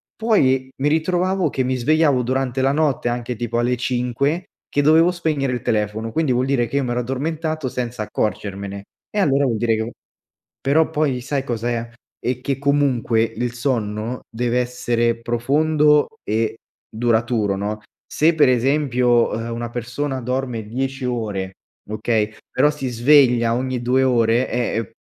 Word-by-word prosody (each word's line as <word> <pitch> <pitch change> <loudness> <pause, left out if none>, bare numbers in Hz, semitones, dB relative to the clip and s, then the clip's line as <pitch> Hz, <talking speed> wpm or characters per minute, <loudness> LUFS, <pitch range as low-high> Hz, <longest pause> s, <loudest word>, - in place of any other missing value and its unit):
poi 135 - +2
mi 140 - 0
ritrovavo 180 +4 +1
che 130 - -1
mi 130 +1 0
svegliavo 145 +1 +3
durante 130 +1 -1
la 135 +1 +3
notte, 145 -5 +1
anche 120 0 -3
tipo 120 +1 -2
alle 120 +1 +1
5 125 +7 -1 0.2
che 145 - +1
dovevo 160 +4 +5
spegnere 155 -6 -1
il 125 -2 -2
telefono, 110 +1 -1
quindi 160 -4 +1
vuol 125 +1 +1
dire 130 -3 +1
che 140 - -2
io 140 - +1
mi 120 - -2
ero 120 +1 0
addormentato 155 +4 -3
senza 120 -3 -3
accorgermene 100 -2 -3 0.3
e 210 - -2
allora 140 -7 +3
vuol 120 -4 0
dire 115 0 +1
che 110 +2 -3 0.7
però 155 +4 +2
poi 140 -5 0
sai 140 +1 -2
cos’è, 120 -1 -2 0.3
è 125 0 -2
che 135 0 -1
comunque 135 -5 +1
il 115 +1 -2
sonno 115 -2 -2
deve 120 +1 0
essere 120 -1 0
profondo 150 +5 +2 0.2
e 110 +1 -1 0.3
duraturo, 115 -2 +1
no, 105 +2 -3 0.3
se 160 +3 +2
per 155 -4 +4
esempio, 125 -2 +2
uhm, 115 +1 -3
una 120 0 -4
persona 125 +4 -3
dorme 125 -2 -3
10 130 +3 -3
ore, 105 -6 -3 0.4
okay 110 0 0 0.2
però 150 - +3
si 140 -3 -4
sveglia 120 -1 +4
ogni 130 0 -2
2 130 +2 +2
ore, 120 -1 +2
è 120 -1 -1
è 115 -3 -3
125 Hz, 160 wpm, -21 LUFS, 115-140 Hz, 0.7 s, dovevo